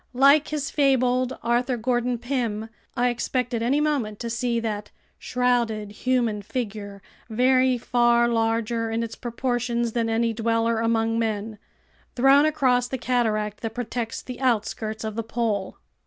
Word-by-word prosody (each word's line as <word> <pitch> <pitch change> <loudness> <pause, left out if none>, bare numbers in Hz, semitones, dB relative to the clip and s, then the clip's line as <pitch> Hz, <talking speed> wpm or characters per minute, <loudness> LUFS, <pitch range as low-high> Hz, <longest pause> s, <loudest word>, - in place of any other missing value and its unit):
Like 280 +3 +5
his 295 -2 -3
fabled 255 -3 +2
Arthur 240 +2 +1
Gordon 240 +1 0
Pym, 230 -3 -2 0.3
I 245 +1 +3
expected 245 0 -1
any 260 +5 +2
moment 280 -9 0
to 235 -1 -3
see 235 0 0
that 210 -2 -4 0.3
"shrouded 235 -4 0
human 235 -1 0
figure, 205 -3 -5 0.3
very 255 +2 +3
far 240 0 +3
larger 230 0 0
in 225 +1 -1
its 225 -1 -5
proportions 240 -1 -2
than 230 0 -1
any 230 0 +1
dweller 230 0 +1
among 225 0 +1
men," 215 -1 -2 0.6
thrown 270 +3 +5
across 255 -5 +2
the 260 - -3
cataract 215 -4 0
that 225 -1 -4
protects 235 -1 -4
the 250 - -8
outskirts 220 -3 -1
of 220 -1 -3
the 230 - -1
pole! 220 -4 -2
235 Hz, 140 wpm, -24 LUFS, 225-250 Hz, 0.6 s, Like